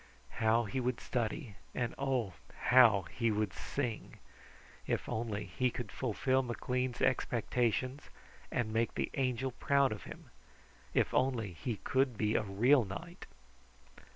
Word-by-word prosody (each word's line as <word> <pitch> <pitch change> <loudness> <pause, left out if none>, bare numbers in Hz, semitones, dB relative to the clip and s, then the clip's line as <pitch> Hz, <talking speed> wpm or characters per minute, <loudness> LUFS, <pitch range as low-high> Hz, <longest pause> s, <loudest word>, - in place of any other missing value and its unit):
How 115 +1 +4
he 115 +5 -3
would 125 -1 -1
study, 120 -2 -3 0.2
and 120 -2 -1
oh, 130 -8 -1 0.4
how 115 -6 +7
he 115 -1 0
would 105 -3 0
sing! 120 -6 -4 0.7
If - - -1
only 110 -2 -2
he 125 0 +2
could 120 -3 -6
fulfill 130 +2 +1
McLean's 125 0 -2
expectations, 125 +1 0 0.4
and 110 -3 -1
make 115 +1 +1
the - - -1
Angel 130 -1 0
proud 140 +2 +2
of 105 - -6
him! - - -11 0.6
If - - +2
only 120 -7 +1
he 115 +7 -3
could 130 -1 +1
be 105 0 +1
a - - +3
real 115 +7 +4
knight! 170 - -8
120 Hz, 135 wpm, -33 LUFS, 110-130 Hz, 0.7 s, how